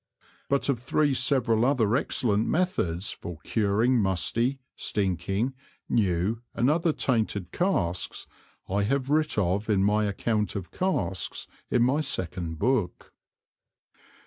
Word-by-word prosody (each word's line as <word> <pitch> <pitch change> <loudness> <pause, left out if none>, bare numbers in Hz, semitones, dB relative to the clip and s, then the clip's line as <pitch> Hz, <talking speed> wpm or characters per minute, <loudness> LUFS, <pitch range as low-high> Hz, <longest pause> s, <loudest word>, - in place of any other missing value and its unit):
But 140 0 +1
of 135 -4 +1
three 140 +4 +1
several 125 -4 +2
other 120 -4 +2
excellent 110 -5 +1
Methods 105 - 0
for 85 -2 -8
curing 110 +4 +2
musty, 110 +8 +1 0.2
stinking, 95 - -1 0.3
new 100 +1 +1
and 120 +5 +3
other 165 +1 +2
tainted 110 - -1
Casks, 90 - 0 0.4
I 100 +2 0
have 135 +6 0
writ 155 -3 +2
of 100 +2 0
in 100 -2 +3
my 105 +1 +2
Account 105 +1 -1
of 95 -3 -5
Casks 95 - -1 0.2
in 120 - +3
my 130 +5 +2
Second 90 - -2
Book. 110 -3 -1
110 Hz, 120 wpm, -27 LUFS, 95-130 Hz, 0.4 s, and